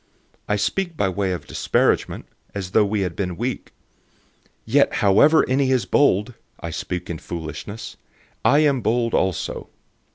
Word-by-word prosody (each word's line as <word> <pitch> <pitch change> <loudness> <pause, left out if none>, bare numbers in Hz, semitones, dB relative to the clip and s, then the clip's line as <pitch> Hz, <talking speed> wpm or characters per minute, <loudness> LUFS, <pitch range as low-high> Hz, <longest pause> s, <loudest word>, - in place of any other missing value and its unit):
011:021 - - -41 0.4
I 105 - +2
speak 165 - -1
by 95 - +1
way 95 0 -1
of 90 - -4
disparagement, - - 0 0.3
as 95 -2 -4
though 110 - +4
we 105 0 -1
had 90 -3 -2
been 90 -3 -3
weak. 125 +3 -4 0.9
Yet - - +3
however 110 +11 +5
any 130 +1 +2
is 130 -3 +2
bold 125 -5 +2 0.3
(I 85 - -5
speak 90 +2 -4
in 85 -2 -5
foolishness), 85 +6 -7 0.5
I 145 +2 +5
am 140 -4 +2
bold 115 +1 0
also. 95 -3 -1
105 Hz, 155 wpm, -22 LUFS, 90-130 Hz, 0.9 s, however